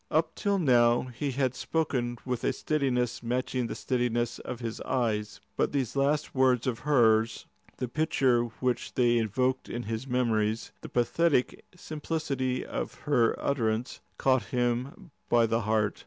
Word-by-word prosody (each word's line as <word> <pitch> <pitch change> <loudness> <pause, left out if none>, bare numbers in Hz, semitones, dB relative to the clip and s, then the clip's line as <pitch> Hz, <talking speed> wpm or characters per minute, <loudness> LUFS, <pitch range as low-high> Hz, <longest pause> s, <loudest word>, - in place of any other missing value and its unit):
Up 160 +1 +1
till 200 -1 0
now 120 -7 +4
he 130 +3 -4
had 130 -1 0
spoken 130 -5 -1
with 125 -2 -2
a - - +1
steadiness 125 -5 0
matching 125 +1 -1
the - - -5
steadiness 120 -2 -1
of 125 - -6
his 115 -2 -5
eyes. 105 -5 -1 0.2
But - - 0
these 135 -4 -1
last 140 +2 +1
words 130 -2 +3
of 125 -3 -1
hers, 115 -6 +3 0.3
the 125 - -2
picture 130 -4 +2
which 120 +1 -3
they 120 -1 +3
evoked 125 +4 0
in 120 +1 -4
his 115 +4 -4
memories, 115 -3 0
the - - -8
pathetic 125 +3 +1
simplicity 145 -6 -3
of - - -4
her 120 -6 +2
utterance, 115 -3 -1 0.2
caught 130 -2 +2
him 125 - -2 0.2
by 120 -1 +5
the 115 +1 0
heart. 110 -1 0
125 Hz, 150 wpm, -28 LUFS, 115-135 Hz, 0.3 s, by